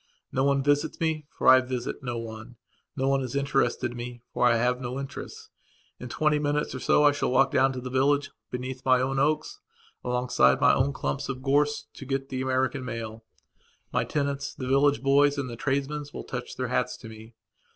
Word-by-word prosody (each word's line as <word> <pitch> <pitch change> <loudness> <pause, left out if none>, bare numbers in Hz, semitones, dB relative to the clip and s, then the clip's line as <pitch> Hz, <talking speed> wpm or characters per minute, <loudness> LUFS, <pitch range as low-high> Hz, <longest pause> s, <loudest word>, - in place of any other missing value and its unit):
No 135 - +1
one 140 0 +2
visits 145 +2 +1
me, 160 -2 -1
for - - -3
I 130 0 +9
visit 125 +1 -4
no 120 -3 -3
one. 115 +1 -8 0.4
No 135 -1 0
one 135 0 +2
is 130 0 -5
interested 135 -4 +1
in 120 - -9
me, 120 0 -7
for 125 - +3
I 120 - +4
have 125 +2 +1
no 125 +1 -4
interests. 435 - -8 0.5
In - - -7
twenty 150 -1 +1
minutes 145 0 -1
or 130 - -5
so 150 - +3
I 145 - +7
shall 145 - -1
walk 135 +1 +3
down 135 +1 +3
to 130 - -5
the 125 0 -6
village, 140 +2 +2 0.2
beneath 125 +1 -5
my 130 -1 +4
own 135 +1 0
oaks, 150 +2 0 0.4
alongside 125 - +2
my - - +5
own 135 +2 +2
clumps 140 0 -3
of 130 -1 -5
gorse, 145 +2 +1
to - - -10
get 135 0 -2
the 130 0 -3
American 130 0 0
mail. 115 -2 -6 0.7
My - - +2
tenants, 140 -1 -2
the 130 - -5
village 140 +1 +3
boys 140 +1 +4
and 140 -2 -2
the - - -6
tradesmen 140 +3 -1
will - - -7
touch - - -6
their - - -2
hats - - -1
to - - -11
me. 110 +1 -12
135 Hz, 205 wpm, -27 LUFS, 125-140 Hz, 0.7 s, I